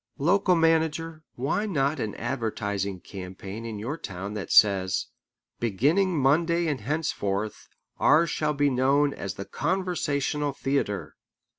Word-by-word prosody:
Local 180 +5 +3
manager, 165 -1 +1
why 140 - -1
not 140 -5 0
an 110 -4 -3
advertising 100 -6 -3
campaign 95 +4 -8
in 110 -2 -5
your 130 +10 -4
town 95 -1 -6
that 105 -2 -5
says: 95 -2 +4 0.5
"Beginning 150 - +2
Monday 165 +5 +3
and 145 -7 -1
henceforth, 105 -7 -2 0.3
ours 160 +3 +4
shall 150 -1 0
be 145 0 +2
known 140 +3 +3
as 95 - -5
the 100 - -6
Conversational 150 - -1
Theatre"? 135 -8 -2
140 Hz, 125 wpm, -26 LUFS, 105-160 Hz, 0.5 s, says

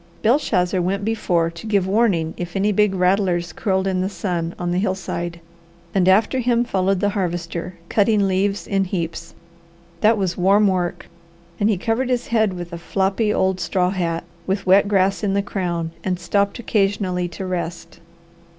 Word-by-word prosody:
Belshazzar 190 -7 +2
went 195 +3 -1
before 175 -7 0
to 170 +6 -9
give 200 -3 +2
warning 190 -6 +1
if 175 +1 -6
any 200 +2 +2
big 210 -1 +2
rattlers 180 -2 +1
curled 190 -2 0
in 185 -1 0
the 190 - -1
sun 175 -4 -3
on 175 -1 -2
the 180 - +1
hillside, 180 -3 -3 0.5
and 190 -1 +3
after 215 +7 +3
him 240 -1 +2
followed 195 -4 0
the 205 - +2
Harvester 175 -2 -3
cutting 205 0 +2
leaves 195 +2 0
in 195 -1 0
heaps. 170 -2 -4 0.6
That 220 +3 +4
was 185 -3 -1
warm 200 +3 +4
work 180 -3 -1 0.5
and 205 - +3
he 210 - +2
covered 230 +6 -1
his 245 -1 -1
head 220 -4 +2
with 175 -1 -7
a 170 - -5
floppy 195 +4 0
old 190 -2 +1
straw 180 +1 0
hat, 170 -3 -2 0.2
with 195 +1 -1
wet 195 +2 +5
grass 195 0 +1
in 195 -1 +1
the 200 - +1
crown, 175 -5 -3
and 180 -2 -1
stopped 200 +3 0
occasionally 195 -5 0
to 180 +2 -7
rest. 175 -2 -5
190 Hz, 170 wpm, -21 LUFS, 175-205 Hz, 0.6 s, wet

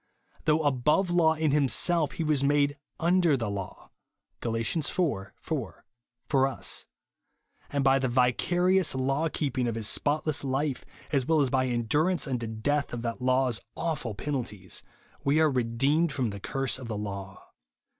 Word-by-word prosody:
Though 155 +1 +3
above 150 +7 +2
law 165 -2 +4
in 155 -2 +1
himself, 150 +3 +2
he 165 - -3
was 150 -3 +1
made 145 0 +2 0.2
"under 170 -3 +3
the 115 -4 -2
law" 100 -2 -7 0.5
(Gal. 115 -1 -2
iv. 115 0 -1 0.2
4) 100 - -1
for 130 -1 -3
us; 135 - -2 0.8
and 140 -1 0
by 135 0 +4
the 130 - 0
vicarious 175 +9 +2
law 135 +5 0
keeping 135 -5 -1
of 115 - -2
his 110 -2 -1
spotless 150 +3 +1
life, 135 +1 -1 0.3
as 135 -4 +1
well 160 -1 +3
as 135 -3 +2
by 130 -1 +2
endurance 145 +10 +1
unto 125 -4 -2
death 140 +7 -1
of 120 -1 -4
that 115 +1 -3
law's 130 -2 +2 0.2
awful 150 -10 -2
penalties, 105 -8 -4 0.4
we 140 +3 +3
are 155 -2 +4
redeemed 135 +7 +1
from 125 -5 -1
the 100 - -7
curse 135 +5 -1
of 125 - -8
the 110 -2 -3
law. 100 -1 -7
135 Hz, 155 wpm, -28 LUFS, 120-155 Hz, 0.8 s, law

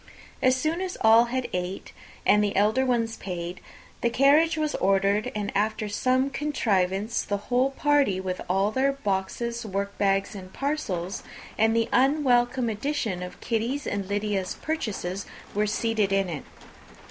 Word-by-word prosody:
As 255 0 +4
soon 310 +7 -1
as 370 -1 -4
all 225 +2 +7
had 255 +1 -2
ate, 180 +1 -4 0.3
and 210 0 +5
the 205 -1 -1
elder 215 +6 +3
ones 230 -3 0
paid, 180 -1 -5 0.4
the 235 - +2
carriage 290 +7 +4
was 305 -1 0
ordered; 195 +4 +2
and, 205 -1 -2
after 215 +1 0
some 255 +6 +1
contrivance, 215 -8 0
the 205 - -2
whole 250 +6 +1
party, 280 -8 +2
with 185 -1 -4
all 195 +3 +2
their 270 +4 +2
boxes, 235 +1 -2
workbags, 200 -1 -1
and 185 -2 -9
parcels, 205 - -2 0.3
and 225 +1 +3
the 230 -1 +2
unwelcome 255 -2 +3
addition 220 -4 -2
of 180 0 -7
Kitty's 235 +5 -1
and 200 -1 -2
Lydia's 205 -2 -1
purchases, 200 - -3 0.3
were 210 +1 +1
seated 220 -1 0
in 195 -1 +1
it. 155 -5 -5
220 Hz, 145 wpm, -26 LUFS, 195-260 Hz, 0.4 s, all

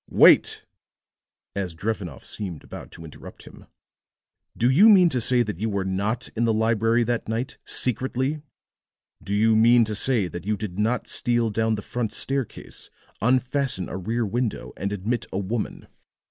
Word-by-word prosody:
"Wait!" - - +5 0.9
As 95 -4 -3
Drevenoff 95 - -4
seemed 90 -7 -7
about - - -10
to 80 - -11
interrupt 75 - -12
him. - - -15 0.9
"Do 120 - +2
you 175 - +6
mean 185 -5 +7
to 130 -5 -1
say 125 +1 +3
that 105 -6 -6
you 110 +2 -1
were 100 -2 -2
not 100 +5 -2
in 115 +1 +1
the 115 - +2
library 115 +1 +2
that 120 -1 -2
night, 115 +3 -3
secretly? 130 +4 -1 0.8
Do 100 - -2
you 110 +1 +3
mean 115 +1 +5
to 110 - -4
say 110 -2 +3
that 85 0 -7
you 105 -1 0
did 95 -2 -6
not 115 +4 0
steal 120 -2 0
down 110 +1 0
the 105 - -7
front 120 -3 -3
staircase, 135 -3 -4 0.3
unfasten 130 -2 0
a - - -5
rear 115 +5 -2
window, 120 +2 -3
and 100 +3 -3
admit 105 +4 -2
a - - -3
woman? 105 +3 -4
110 Hz, 165 wpm, -24 LUFS, 100-120 Hz, 0.9 s, mean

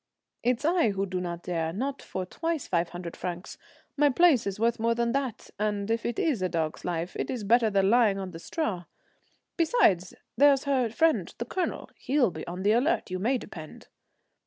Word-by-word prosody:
"It's 250 +3 0
I 335 -7 +3
who 195 -1 -1
do 185 -1 -3
not 175 -1 -5
dare 165 -2 -2
not 265 +9 -3
for 185 - -5
twice 325 - -3
five 170 -1 0
hundred 175 -1 -7
francs. 180 +1 -6 0.4
My 295 0 +4
place 280 -5 +4
is 200 +1 -4
worth 230 +1 +1
more 230 +1 +2
than 235 0 0
that; 265 -4 -3
and 210 0 -1
if 230 0 0
it 235 - -3
is 280 - +1
a 185 - 0
dog's 160 -2 -2
life, 175 0 -3
it - - -3
is 245 -5 -3
better 225 +2 +4
than 195 -1 +2
lying 225 -5 +4
on 190 -1 -5
the 165 - -9
straw. 195 - -3 0.7
Besides, 315 - +2 0.2
there's 275 +2 +5
her 265 -4 +1
friend 320 +8 +2
the - - -3
Colonel, 370 - -3
he'll 260 -6 +1
be 160 -1 -8
on 180 +2 -5
the 205 - +4
alert, 245 - +1
you 185 - -2
may 245 +7 +1
depend." 160 -9 -10
215 Hz, 200 wpm, -28 LUFS, 180-265 Hz, 0.7 s, there's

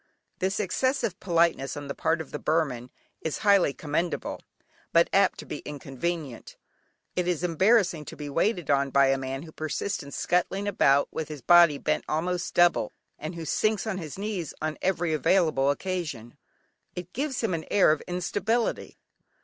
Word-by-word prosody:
This 190 +2 0
excessive 230 0 0
politeness 165 -6 +1
on 145 - -6
the 140 - -3
part 160 +3 0
of 155 - -10
the 150 - -4
Burman 140 -7 0 0.3
is 160 - -2
highly 200 -7 +5
commendable, 160 +4 -3 0.5
but 170 0 +4
apt 195 -1 +4
to - - -8
be - - -6
inconvenient. 145 -1 -5 0.6
It 180 -1 0
is 180 -2 -1
embarrassing 180 -1 +3
to - - -8
be 150 - -7
waited 170 +2 0
on 140 0 +2
by 135 0 +4
a 135 - +2
man 135 +2 -4
who 160 - -11
persists 155 +6 -3
in 140 - -10
scuttling 185 +6 0
about 140 -8 +3
with 160 - -4
his 150 -5 -8
body 170 -1 +6
bent 75 - -1
almost 175 +3 -2
double, 175 -11 +3 0.3
and 155 +3 -5
who 165 -1 -6
sinks 215 +7 0
on 205 -4 -2
his 155 -3 -7
knees 195 -6 -4
on 155 0 -3
every 175 -3 0
available 155 -4 +2
occasion; 150 -8 -3 0.6
it 180 0 -7
gives 270 +1 -2
him 220 -5 0
an 160 -1 -3
air 195 -6 +5
of 155 - 0
instability. 200 +6 -1
170 Hz, 170 wpm, -27 LUFS, 145-185 Hz, 0.6 s, body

